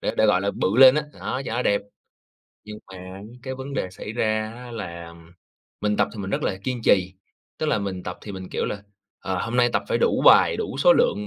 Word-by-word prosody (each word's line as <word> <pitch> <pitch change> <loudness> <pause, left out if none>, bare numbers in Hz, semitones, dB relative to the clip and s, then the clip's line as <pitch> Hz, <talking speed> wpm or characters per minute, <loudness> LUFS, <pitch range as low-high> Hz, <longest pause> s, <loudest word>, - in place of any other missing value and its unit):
để - - -1
để, 110 - +4
gọi 95 -3 +3
là, 100 +1 0
bự 100 +2 -1
lên 130 0 +9
á, 150 - +1 0.2
đó, 130 - -3
cho - - -4
nó 125 - 0
đẹp. 100 -3 +1 0.8
Nhưng 105 0 -9
mà 95 - -9
á 95 +1 -10 0.2
cái 130 -1 -5
vấn 135 +1 -7
đề 90 - -2
xảy 105 +3 -8
ra 110 -1 -1
á 125 0 -10
là 85 -6 -7 0.7
mình 105 0 0
tập - - +2
thì - - -9
mình 95 -1 -5
rất - - -1
là 95 - -1
kiên 125 -3 -3
trì, 95 -3 +3 0.5
tức 155 - -1
là 130 -8 +1
mình 95 -2 -4
tập 90 - -6
thì 105 - -8
mình, 95 -1 -8
kiểu - - -2
là, 100 - -4 0.4
ờ, 95 -1 -3
hôm 115 +2 -3
nay 120 -1 +4
tập - - +1
phải - - +1
đủ 475 - +1
bài, - - +7
đủ 440 - -4
số - - +6
lượng 485 - +1
105 Hz, 250 wpm, -24 LUFS, 95-125 Hz, 0.8 s, lên